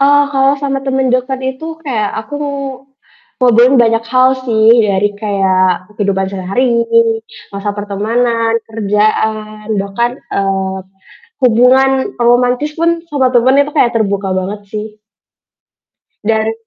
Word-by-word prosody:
Eee, 285 Hz, +1 st, +5 dB
kalau 270 Hz, 0 st, +3 dB
sama 275 Hz, -1 st, -1 dB
temen 265 Hz, -1 st, 0 dB
deket 255 Hz, +1 st, -1 dB, 0.2 s
itu 315 Hz, -, -10 dB, 0.2 s
kayak 220 Hz, -7 st, -1 dB
aku 220 Hz, +6 st, -10 dB, 1.0 s
ngobrolin 245 Hz, +1 st, +4 dB
banyak 225 Hz, 0 st, +2 dB
hal 255 Hz, 0 st, +4 dB, 0.2 s
sih, 220 Hz, -2 st, 0 dB, 0.2 s
dari 200 Hz, 0 st, +1 dB
kayak 190 Hz, -3 st, +1 dB
kehidupan 195 Hz, -2 st, 0 dB
sehari, 235 Hz, +6 st, 0 dB, 0.7 s
masa 200 Hz, +1 st, -3 dB
pertemanan, 225 Hz, +3 st, -1 dB
kerjaan, 215 Hz, 0 st, -1 dB, 0.2 s
bahkan, 235 Hz, +5 st, -2 dB, 0.2 s
eee, 190 Hz, -1 st, -1 dB, 0.7 s
hubungan 250 Hz, +3 st, +4 dB, 0.3 s
romantis 245 Hz, +4 st, +2 dB
pun 335 Hz, -, +3 dB, 0.2 s
sama 275 Hz, -4 st, +1 dB
temen 250 Hz, +2 st, +4 dB
itu 290 Hz, -, -2 dB
kayak 240 Hz, -, +3 dB
terbuka 200 Hz, -3 st, -1 dB
banget 195 Hz, +3 st, -5 dB
sih. 215 Hz, -1 st, -4 dB, 1.4 s
Dan 220 Hz, 0 st, +1 dB
mhm. 225 Hz, 0 st, -2 dB
225 Hz, 120 wpm, -14 LUFS, 205-255 Hz, 1.4 s, Eee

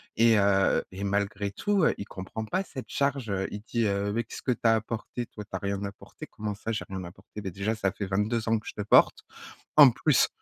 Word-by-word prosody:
et 115 Hz, 0 st, +5 dB
heu 100 Hz, -1 st, +3 dB
et 95 Hz, +2 st, -6 dB
malgré 100 Hz, 0 st, -1 dB
tout, 200 Hz, -, +1 dB
heu, -, -, +4 dB
il 100 Hz, -, -5 dB
comprend 95 Hz, +3 st, -6 dB
pas 185 Hz, -, -1 dB
cette 135 Hz, -8 st, -9 dB
charge, 140 Hz, -4 st, 0 dB
heu, 95 Hz, -1 st, -1 dB
il 105 Hz, -, -5 dB
dit, 115 Hz, 0 st, 0 dB
heu: 100 Hz, 0 st, 0 dB
«Mais 115 Hz, +2 st, 0 dB
qu'est-ce -, -, -9 dB
que 130 Hz, -, 0 dB
tu 120 Hz, -, -2 dB
as 115 Hz, -1 st, +5 dB
apporté, 115 Hz, +2 st, -4 dB
toi? 105 Hz, -, -9 dB
Tu 100 Hz, -, -24 dB
as 95 Hz, -, -3 dB
rien 100 Hz, +1 st, -2 dB
apporté». 100 Hz, 0 st, -8 dB
Comment 105 Hz, -1 st, -5 dB
ça 110 Hz, +2 st, -4 dB
j'ai 110 Hz, -, -3 dB
rien 95 Hz, -1 st, -5 dB
apporter? 95 Hz, +4 st, -10 dB
Beh, 95 Hz, -2 st, -4 dB
déjà 100 Hz, +5 st, -1 dB
ça 95 Hz, -3 st, 0 dB
fait 100 Hz, -, -4 dB
22 105 Hz, +4 st, 0 dB
ans 115 Hz, 0 st, +3 dB
que 110 Hz, -, -10 dB
je -, -, -5 dB
te 105 Hz, -, -5 dB
porte, 105 Hz, -, +4 dB, 0.5 s
en 145 Hz, -3 st, +10 dB
plus. 150 Hz, +2 st, +3 dB
105 Hz, 250 wpm, -28 LUFS, 100-115 Hz, 0.5 s, en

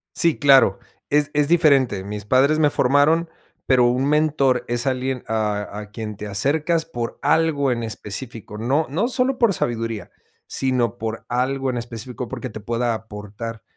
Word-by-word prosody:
Sí, 170 Hz, -3 st, +2 dB
claro, 140 Hz, -2 st, +5 dB, 0.3 s
es 145 Hz, 0 st, +2 dB
es 145 Hz, -1 st, +2 dB
diferente. 140 Hz, -, +3 dB
Mis 105 Hz, 0 st, -6 dB
padres 135 Hz, +7 st, +3 dB
me 150 Hz, -, +4 dB
formaron, 145 Hz, +5 st, +3 dB, 0.4 s
pero, 125 Hz, -2 st, +4 dB
un 125 Hz, +3 st, +1 dB
mentor 140 Hz, -5 st, +2 dB
es 120 Hz, +2 st, -1 dB
alguien 130 Hz, 0 st, -1 dB
a 105 Hz, -2 st, -2 dB
a 105 Hz, -1 st, -10 dB
quien 105 Hz, -2 st, -6 dB
te 105 Hz, -, -6 dB
acercas 150 Hz, -, 0 dB
por 120 Hz, -1 st, -5 dB
algo 145 Hz, -5 st, +2 dB
en 115 Hz, -1 st, -2 dB
específico. 110 Hz, 0 st, -5 dB
No 135 Hz, +8 st, 0 dB
no 185 Hz, -, 0 dB
solo 255 Hz, +1 st, 0 dB
por 230 Hz, -5 st, +3 dB
sabiduría, 115 Hz, -5 st, -3 dB, 0.4 s
sino, 125 Hz, -3 st, 0 dB
por 115 Hz, -1 st, -5 dB
algo 130 Hz, +2 st, 0 dB
en 125 Hz, -, -2 dB
específico, 120 Hz, +1 st, -6 dB
porque, 130 Hz, +1 st, -6 dB
te 110 Hz, -1 st, -8 dB
pueda 115 Hz, +2 st, -1 dB
aportar. 110 Hz, +1 st, -7 dB
125 Hz, 160 wpm, -22 LUFS, 115-145 Hz, 0.4 s, claro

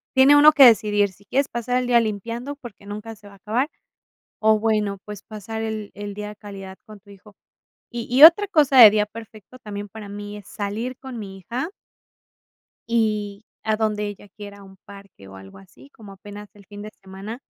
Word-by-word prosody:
tiene 265 Hz, +2 st, +6 dB
uno 300 Hz, +1 st, +8 dB
que 285 Hz, -, +7 dB
decidir 210 Hz, -3 st, +4 dB
si 200 Hz, +2 st, -23 dB
quieres 275 Hz, +7 st, -1 dB
pasar 240 Hz, +1 st, -2 dB
el 250 Hz, -1 st, -1 dB
día 240 Hz, -1 st, +4 dB
limpiando 230 Hz, +6 st, -5 dB
porque 210 Hz, -7 st, -13 dB
nunca 210 Hz, +2 st, -8 dB
se 210 Hz, -1 st, -18 dB
va 200 Hz, -, -15 dB
a -, -, -19 dB
acabar, 230 Hz, +9 st, -2 dB, 0.7 s
o 220 Hz, 0 st, +3 dB
bueno, 210 Hz, -3 st, 0 dB
pues, 210 Hz, -1 st, -9 dB
pasar 220 Hz, +1 st, -7 dB
el 215 Hz, -2 st, -5 dB
el 205 Hz, 0 st, -7 dB
día 210 Hz, 0 st, -6 dB
de 210 Hz, -, -12 dB
calidad 195 Hz, -2 st, -10 dB
con 215 Hz, -1 st, -13 dB
tu 200 Hz, +1 st, -21 dB
hijo. 200 Hz, +1 st, -17 dB, 0.6 s
Y 240 Hz, -2 st, -6 dB
y 260 Hz, +4 st, +3 dB
otra 390 Hz, +5 st, +7 dB
cosa, 290 Hz, -7 st, +3 dB
de 220 Hz, -3 st, +11 dB
día 210 Hz, 0 st, +1 dB
perfecto 220 Hz, +2 st, -13 dB
también 205 Hz, -4 st, -8 dB
para 210 Hz, 0 st, -11 dB
mí 205 Hz, +1 st, -8 dB
es 205 Hz, -, -15 dB
salir 220 Hz, +5 st, -5 dB
con 260 Hz, -3 st, -9 dB
mi 195 Hz, -3 st, -9 dB
hija 240 Hz, -, -5 dB, 1.2 s
y 215 Hz, -2 st, -1 dB, 0.2 s
a 220 Hz, -1 st, 0 dB
donde 210 Hz, -1 st, -1 dB
ella 205 Hz, 0 st, -10 dB
quiera, 205 Hz, -1 st, -10 dB
a -, -, -14 dB
un 190 Hz, 0 st, -16 dB
parque, 200 Hz, -, -15 dB
o 95 Hz, -, -13 dB
algo 95 Hz, 0 st, -13 dB
así, 110 Hz, +7 st, -18 dB
como 205 Hz, -3 st, -14 dB
apenas 205 Hz, +1 st, -12 dB
el 205 Hz, -1 st, -19 dB
fin 205 Hz, +1 st, -11 dB
de 210 Hz, -, -8 dB
semana, 195 Hz, +5 st, -9 dB
210 Hz, 205 wpm, -22 LUFS, 200-230 Hz, 1.2 s, de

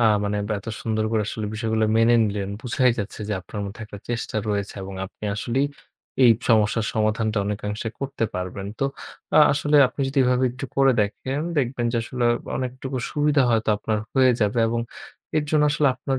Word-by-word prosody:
আ -, -, +4 dB, 0.2 s
মানে 105 Hz, 0 st, -1 dB, 0.2 s
এত 100 Hz, -, -15 dB, 0.2 s
সুন্দর 110 Hz, -1 st, 0 dB
করে 110 Hz, -1 st, +2 dB
আসলে 110 Hz, -1 st, -4 dB
বিষয়গুলো 110 Hz, 0 st, 0 dB
মেনে 115 Hz, +1 st, +5 dB
নিলেন। 100 Hz, -1 st, -2 dB
বুঝাই 125 Hz, +1 st, +2 dB
যাচ্ছে 100 Hz, +1 st, -5 dB
যে -, -, -1 dB
আপনার 100 Hz, +3 st, -7 dB
মধ্যে 100 Hz, +3 st, -8 dB
একটা 105 Hz, -1 st, -10 dB
চেষ্টা 120 Hz, -2 st, -3 dB
রয়েছে। 100 Hz, -1 st, -2 dB
এবং 95 Hz, 0 st, -7 dB
আপনি 105 Hz, -, -12 dB
আসলেই 125 Hz, +6 st, 0 dB, 0.6 s
এই 120 Hz, -, +8 dB, 0.2 s
সমস্যার 110 Hz, 0 st, +3 dB
সমাধানটা 110 Hz, 0 st, +1 dB
অনেকাংশে 105 Hz, +2 st, -3 dB
করতে 135 Hz, -4 st, -2 dB
পারবেন। 90 Hz, +2 st, -4 dB
তো 135 Hz, -, +1 dB, 0.5 s
আ -, -, +8 dB
আসলে 145 Hz, +1 st, +2 dB
আপনি 140 Hz, -, -8 dB
যদি 135 Hz, +1 st, -1 dB
এভাবে 125 Hz, +1 st, +2 dB
একটু 125 Hz, +2 st, -7 dB
করে 135 Hz, -1 st, +5 dB
দেখেন 105 Hz, +7 st, -2 dB, 0.2 s
দেখবেন 125 Hz, -2 st, -1 dB
যে -, -, 0 dB
আসলে 120 Hz, +1 st, -3 dB, 0.3 s
অনেকটুকু 130 Hz, +1 st, -4 dB
সুবিধা 150 Hz, -1 st, +2 dB
হয়তো 110 Hz, -1 st, +1 dB
আপনার 105 Hz, +1 st, -1 dB, 0.2 s
হয়ে 130 Hz, -1 st, +5 dB
যাবে। 105 Hz, +2 st, +1 dB
এবং 115 Hz, +1 st, -1 dB, 0.6 s
এর 150 Hz, -, +2 dB
জন্য 155 Hz, -1 st, +3 dB
আসলে 150 Hz, -1 st, +3 dB
আপনার 135 Hz, +1 st, -2 dB
115 Hz, 180 wpm, -23 LUFS, 105-130 Hz, 0.6 s, এই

